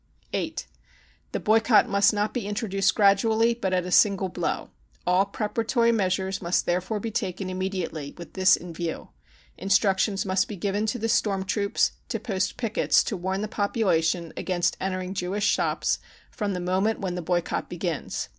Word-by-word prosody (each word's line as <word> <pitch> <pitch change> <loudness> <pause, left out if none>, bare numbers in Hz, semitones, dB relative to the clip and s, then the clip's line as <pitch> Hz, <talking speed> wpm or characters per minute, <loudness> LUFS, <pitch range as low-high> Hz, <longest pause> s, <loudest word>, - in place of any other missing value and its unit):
(8) - - -2 0.7
The - - -2
boycott 220 +1 +4
must 200 0 +4
not 210 0 -1
be 235 -6 -3
introduced 200 -2 0
gradually, 220 +3 +4
but 195 -5 -3
at 180 -1 +1
a 180 - -5
"Single 195 -1 +4
blow. - - -3 0.3
All 180 +2 +3
preparatory 230 +3 +1
measures 190 -2 0
must 175 0 +1
therefore 185 +4 -1
be 225 +2 -4
taken 185 -1 -3
immediately 185 -6 -4
with 170 -1 -10
this 190 0 +5
in 175 -1 -9
view. 165 -1 -4 0.5
Instructions 195 +1 +2
must 185 0 +1
be 210 - -6
given 200 +3 -1
to 230 - -1
the 225 -1 -2
storm 205 -4 +1
troops 200 +2 +1 0.2
to 225 - -2
post 190 -4 -2
pickets 225 -3 +2
to 215 - -3
warn 190 +2 -2
the 215 - -2
population 185 -6 0
against 175 -2 0
entering 185 -1 -2
Jewish 195 +2 -2
shops - - +1 0.3
from 205 -4 -2
the - - -2
moment 190 +5 0
when 185 -2 -3
the 180 - -3
boycott 175 0 -1
begins. 175 - -3
195 Hz, 165 wpm, -26 LUFS, 185-210 Hz, 0.7 s, this